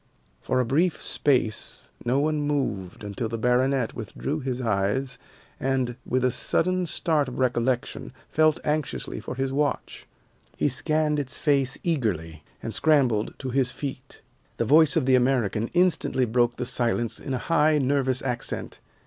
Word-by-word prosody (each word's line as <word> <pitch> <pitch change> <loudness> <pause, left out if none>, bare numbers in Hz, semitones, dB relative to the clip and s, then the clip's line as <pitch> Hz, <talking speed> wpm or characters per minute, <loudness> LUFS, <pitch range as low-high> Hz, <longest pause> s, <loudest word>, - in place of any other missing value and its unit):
For 130 - 0
a 125 - +2
brief 160 +8 +1
space 125 -6 -1
no 125 +3 +1
one 150 +1 +1
moved 130 -12 -2
until 105 +3 -4
the 115 - -3
baronet 125 +1 +1
withdrew 130 +6 -4
his 130 -3 -3
eyes 115 +3 -1 0.4
and, 130 -2 0
with 130 0 +1
a 125 - +3
sudden 185 +7 0
start 155 -3 0
of 125 - -7
recollection, 125 -1 -1 0.2
felt 155 0 +3
anxiously 150 - -2
for - - -6
his 135 0 -1
watch. 145 +1 -2 0.5
He - - +2
scanned 150 +3 +1
its 140 -1 -2
face 140 -4 +1
eagerly, 90 - -1 0.2
and - - -3
scrambled 130 -9 +2
to 130 -2 -5
his 130 -1 +1
feet. 135 -2 -7 0.3
The - - 0
voice 155 +3 +5
of 160 -6 +2
the 130 - +3
American 120 -4 +2
instantly 175 -7 +3
broke 120 +1 +1
the 125 - -3
silence 120 -2 0
in 135 - -3
a 125 - -5
high, 155 -1 +4
nervous 135 -2 +1
accent. 125 -2 -4
130 Hz, 155 wpm, -25 LUFS, 120-145 Hz, 0.5 s, voice